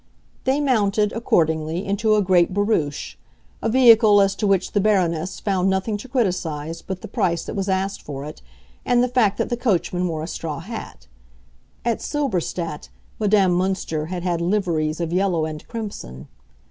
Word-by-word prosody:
They 265 Hz, +2 st, +2 dB
mounted, 210 Hz, -7 st, +2 dB
accordingly, 160 Hz, -5 st, 0 dB
into 215 Hz, +2 st, +2 dB
a 210 Hz, -, +3 dB
great 180 Hz, -1 st, +3 dB
barouche—a 205 Hz, +1 st, -3 dB
vehicle 225 Hz, -4 st, +6 dB
as 195 Hz, -1 st, +3 dB
to 210 Hz, -, 0 dB
which 195 Hz, -2 st, +1 dB
the 205 Hz, -, +1 dB
Baroness 185 Hz, -4 st, +1 dB
found 190 Hz, -2 st, +1 dB
nothing 190 Hz, +3 st, 0 dB
to 215 Hz, -, -10 dB
criticise 170 Hz, -, -2 dB
but 190 Hz, -1 st, -6 dB
the -, -, -5 dB
price 190 Hz, -7 st, 0 dB
that -, -, -5 dB
was 195 Hz, 0 st, -2 dB
asked 190 Hz, +1 st, -1 dB
for 140 Hz, -1 st, -7 dB
it 155 Hz, +2 st, -9 dB, 0.4 s
and 245 Hz, 0 st, +3 dB
the -, -, +2 dB
fact 235 Hz, -5 st, +2 dB
that -, -, -1 dB
the 240 Hz, -, -1 dB
coachman 180 Hz, -6 st, 0 dB
wore 160 Hz, -2 st, -3 dB
a -, -, -5 dB
straw 160 Hz, -3 st, -4 dB
hat. 195 Hz, -, -8 dB, 0.8 s
(At 235 Hz, -2 st, +1 dB
Silberstadt 180 Hz, -, -2 dB, 0.3 s
Madame 205 Hz, -3 st, +3 dB
Münster 180 Hz, -4 st, -1 dB
had 180 Hz, 0 st, -4 dB
had 175 Hz, -2 st, -1 dB
liveries 170 Hz, -5 st, 0 dB
of 170 Hz, -1 st, -2 dB
yellow 180 Hz, -4 st, +1 dB
and 155 Hz, -1 st, -7 dB
crimson.) 135 Hz, -, -7 dB
190 Hz, 165 wpm, -22 LUFS, 165-215 Hz, 0.8 s, vehicle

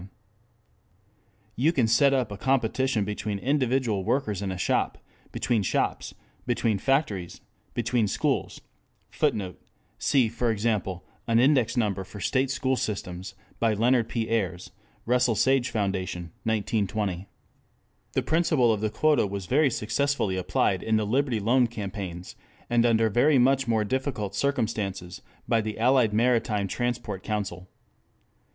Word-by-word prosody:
] -, -, -42 dB, 0.7 s
you 140 Hz, +9 st, +3 dB
can 130 Hz, -9 st, +2 dB
set 135 Hz, +5 st, +4 dB
up 130 Hz, -5 st, 0 dB
a -, -, -4 dB
competition 130 Hz, -2 st, +1 dB
between 105 Hz, 0 st, -3 dB
individual 125 Hz, -4 st, 0 dB
workers 105 Hz, -3 st, -1 dB
in 100 Hz, -2 st, -2 dB
a 95 Hz, -, -4 dB
shop; 90 Hz, -, 0 dB, 0.3 s
between 115 Hz, -3 st, 0 dB
shops; 95 Hz, -, -1 dB, 0.3 s
between 115 Hz, -4 st, +1 dB
factories; 105 Hz, -, -1 dB, 0.3 s
between 120 Hz, -1 st, +1 dB
schools; 95 Hz, -, -1 dB, 0.5 s
[Footnote: 95 Hz, -4 st, -1 dB, 0.4 s
See, 130 Hz, -5 st, +3 dB
for 115 Hz, +2 st, -1 dB
example, 105 Hz, -5 st, -1 dB, 0.2 s
An 115 Hz, -1 st, +3 dB
Index 130 Hz, -2 st, +3 dB
Number 100 Hz, -4 st, 0 dB
for 100 Hz, +2 st, -11 dB
State 130 Hz, +7 st, +1 dB
School 130 Hz, 0 st, 0 dB
Systems 95 Hz, -4 st, -4 dB, 0.2 s
by 115 Hz, -2 st, +2 dB
Leonard 120 Hz, +2 st, +2 dB
P. 115 Hz, -2 st, -2 dB
Ayres, 95 Hz, -6 st, -2 dB, 0.3 s
Russell 125 Hz, -1 st, +2 dB
Sage 130 Hz, +2 st, +2 dB
Foundation, 95 Hz, -5 st, -3 dB
1920. 105 Hz, -3 st, -1 dB, 0.9 s
The 130 Hz, -, 0 dB
principle 155 Hz, -5 st, +2 dB
of 105 Hz, -, -3 dB
the 110 Hz, -, 0 dB
quota 150 Hz, +1 st, +2 dB
was 100 Hz, -1 st, -5 dB
very 140 Hz, -, +3 dB
successfully 115 Hz, -2 st, 0 dB
applied 95 Hz, +1 st, 0 dB
in 110 Hz, -, 0 dB
the 110 Hz, -, 0 dB
Liberty 125 Hz, +1 st, +1 dB
Loan 120 Hz, +4 st, +3 dB
Campaigns, 95 Hz, -5 st, -6 dB, 0.4 s
and 120 Hz, 0 st, +4 dB
under 115 Hz, -1 st, +3 dB
very 130 Hz, +7 st, +3 dB
much 135 Hz, +1 st, +3 dB
more 110 Hz, -2 st, +2 dB
difficult 115 Hz, -3 st, -2 dB
circumstances 100 Hz, -, -2 dB, 0.3 s
by 115 Hz, -, +2 dB
the 110 Hz, 0 st, -5 dB
Allied 120 Hz, -1 st, +3 dB
Maritime 110 Hz, -3 st, +1 dB
Transport 120 Hz, -2 st, -3 dB
Council. 100 Hz, -4 st, -4 dB
110 Hz, 135 wpm, -26 LUFS, 100-125 Hz, 0.9 s, set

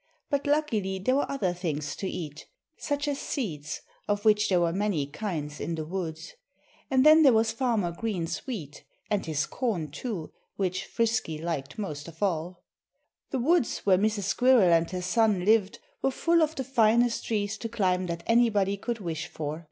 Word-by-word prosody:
But 285 Hz, 0 st, 0 dB
luckily 225 Hz, -11 st, +1 dB
there 225 Hz, +8 st, +1 dB
were 285 Hz, -, 0 dB
other 195 Hz, -11 st, 0 dB
things 155 Hz, -5 st, -3 dB
to 190 Hz, -, -3 dB
eat 150 Hz, -3 st, -6 dB, 0.3 s
such 290 Hz, 0 st, -2 dB
as 285 Hz, -1 st, -1 dB
seeds, 155 Hz, -, -4 dB, 0.3 s
of 205 Hz, +1 st, -1 dB
which 210 Hz, -1 st, +4 dB
there 185 Hz, -2 st, +3 dB
were 170 Hz, -1 st, +1 dB
many 195 Hz, -7 st, 0 dB
kinds 150 Hz, -2 st, -5 dB
in 170 Hz, -, -3 dB
the 155 Hz, -1 st, -4 dB
woods. 175 Hz, -, -5 dB, 0.6 s
And 260 Hz, 0 st, +3 dB
then 310 Hz, +1 st, +8 dB
there 275 Hz, -5 st, +7 dB
was 225 Hz, 0 st, +3 dB
Farmer 230 Hz, -8 st, 0 dB
Green's 180 Hz, -1 st, -3 dB
wheat 160 Hz, -, -6 dB, 0.3 s
and 205 Hz, -2 st, +1 dB
his 155 Hz, -1 st, 0 dB
corn, 190 Hz, -, -2 dB
too, 190 Hz, -, -5 dB, 0.2 s
which 185 Hz, -2 st, -1 dB
Frisky 225 Hz, -9 st, 0 dB
liked 155 Hz, -4 st, -4 dB
most 155 Hz, -8 st, -5 dB
of 165 Hz, +4 st, -7 dB
all. 175 Hz, -1 st, -2 dB, 0.7 s
The 270 Hz, -, -1 dB
woods 275 Hz, +1 st, +1 dB
where 185 Hz, -2 st, +5 dB
Mrs. 210 Hz, 0 st, 0 dB
Squirrel 225 Hz, -2 st, +4 dB
and 165 Hz, 0 st, +3 dB
her 180 Hz, -1 st, -4 dB
son 205 Hz, -1 st, +2 dB
lived 210 Hz, -2 st, +3 dB, 0.2 s
were -, -, +2 dB
full 335 Hz, +5 st, +2 dB
of 315 Hz, 0 st, +1 dB
the 265 Hz, -, -2 dB
finest 235 Hz, -2 st, +2 dB
trees 210 Hz, -1 st, -1 dB
to 230 Hz, -, -4 dB
climb 185 Hz, -5 st, 0 dB
that 170 Hz, 0 st, -4 dB
anybody 210 Hz, -4 st, +3 dB
could 235 Hz, +3 st, -3 dB
wish 165 Hz, -2 st, -4 dB
for. 155 Hz, -2 st, -5 dB
200 Hz, 180 wpm, -28 LUFS, 170-235 Hz, 0.7 s, then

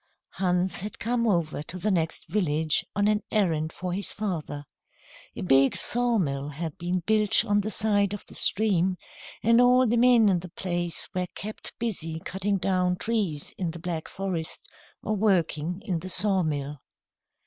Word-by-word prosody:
Hans 180 Hz, 0 st, 0 dB
had 205 Hz, +4 st, -6 dB
come 235 Hz, 0 st, 0 dB
over 170 Hz, -7 st, 0 dB
to 165 Hz, +4 st, -7 dB
the 205 Hz, +4 st, 0 dB
next 165 Hz, -3 st, -1 dB
village 160 Hz, -6 st, +1 dB
on 205 Hz, 0 st, +2 dB
an 210 Hz, 0 st, +2 dB
errand 160 Hz, -7 st, +1 dB
for 180 Hz, +1 st, -4 dB
his 195 Hz, +2 st, -3 dB
father. 165 Hz, -8 st, -4 dB, 0.7 s
A -, -, -6 dB
big 135 Hz, -5 st, +4 dB
sawmill 185 Hz, -, 0 dB
had 155 Hz, +1 st, -5 dB
been 180 Hz, +1 st, -1 dB
built 215 Hz, -1 st, +4 dB
on 205 Hz, 0 st, +2 dB
the 210 Hz, -, -3 dB
side 205 Hz, -3 st, +2 dB
of 205 Hz, -, -6 dB
the -, -, -11 dB
stream, 190 Hz, -3 st, +1 dB, 0.5 s
and 230 Hz, +2 st, +5 dB
all 250 Hz, +1 st, +5 dB
the 240 Hz, 0 st, +2 dB
men 240 Hz, -2 st, +6 dB
in 185 Hz, -3 st, +3 dB
the 180 Hz, +1 st, -9 dB
place 175 Hz, -1 st, -2 dB
were 180 Hz, -1 st, -1 dB
kept 215 Hz, +2 st, -5 dB
busy 165 Hz, -9 st, -3 dB
cutting 195 Hz, +2 st, -1 dB
down 180 Hz, -1 st, +1 dB
trees 190 Hz, -8 st, -2 dB
in 180 Hz, -3 st, -1 dB
the 170 Hz, +1 st, -7 dB
Black 165 Hz, -2 st, -4 dB
Forest, 185 Hz, -4 st, -4 dB, 0.4 s
or 215 Hz, -, -1 dB
working 180 Hz, -4 st, +1 dB
in 180 Hz, -6 st, -1 dB
the 185 Hz, +3 st, -7 dB
sawmill. 155 Hz, -8 st, +1 dB
185 Hz, 165 wpm, -26 LUFS, 165-210 Hz, 0.7 s, men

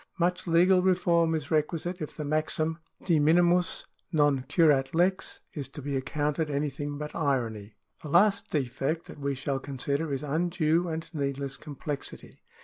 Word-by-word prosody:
Much 180 Hz, +1 st, 0 dB
legal 180 Hz, +3 st, +5 dB
reform 170 Hz, -3 st, +3 dB
is 150 Hz, -3 st, -4 dB
requisite 165 Hz, +3 st, 0 dB
if 155 Hz, -, -6 dB
the 155 Hz, -, -3 dB
maxim 155 Hz, +2 st, 0 dB, 0.3 s
De 165 Hz, -4 st, +3 dB
minimis 175 Hz, +4 st, +3 dB, 0.3 s
non 145 Hz, -4 st, +3 dB
curat 145 Hz, -2 st, +3 dB
lex 185 Hz, +3 st, +1 dB
is 140 Hz, -4 st, -4 dB
to 135 Hz, -, -10 dB
be 140 Hz, 0 st, -3 dB
accounted 150 Hz, +3 st, -1 dB
anything 145 Hz, 0 st, -2 dB
but 150 Hz, 0 st, -6 dB
irony. 115 Hz, -8 st, -1 dB, 0.3 s
The 150 Hz, -, -7 dB
last 195 Hz, +6 st, +3 dB
defect 140 Hz, +3 st, -1 dB
that -, -, -11 dB
we 140 Hz, -1 st, -1 dB
shall 135 Hz, 0 st, -2 dB
consider 140 Hz, +3 st, -2 dB
is 135 Hz, +1 st, -2 dB
undue 165 Hz, +2 st, +1 dB
and 160 Hz, 0 st, -4 dB
need 140 Hz, -3 st, -2 dB
less 140 Hz, -1 st, -4 dB
complexity. 145 Hz, -1 st, -7 dB
150 Hz, 155 wpm, -28 LUFS, 140-170 Hz, 0.3 s, legal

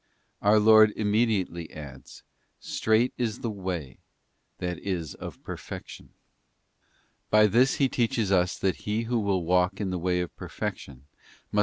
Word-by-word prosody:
Our 105 Hz, +1 st, +5 dB
Lord 110 Hz, 0 st, +7 dB
immediately 105 Hz, -6 st, 0 dB
adds, 70 Hz, -4 st, -11 dB, 0.2 s
' -, -, -45 dB, 0.2 s
Strait 110 Hz, +3 st, +2 dB
is 115 Hz, -2 st, -2 dB
the 115 Hz, -, -2 dB
way,' 90 Hz, -9 st, -5 dB, 0.6 s
that 90 Hz, -2 st, -4 dB
is 85 Hz, -7 st, -3 dB
of -, -, -9 dB
perfection. -, -, -8 dB, 1.2 s
By 105 Hz, 0 st, +6 dB
this 120 Hz, +6 st, +3 dB
He 140 Hz, -, +3 dB
teaches 115 Hz, -5 st, 0 dB
us 90 Hz, -2 st, +2 dB
that 95 Hz, -1 st, 0 dB
He 105 Hz, +2 st, -2 dB
who 120 Hz, +1 st, 0 dB
will 95 Hz, -4 st, 0 dB
walk 90 Hz, +2 st, +2 dB
in 100 Hz, -3 st, -2 dB
the 90 Hz, -, -2 dB
way 90 Hz, +1 st, 0 dB
of 90 Hz, -, -6 dB
perfection 65 Hz, -1 st, -6 dB, 0.5 s
must. 105 Hz, -, +1 dB
100 Hz, 150 wpm, -27 LUFS, 90-110 Hz, 1.2 s, Lord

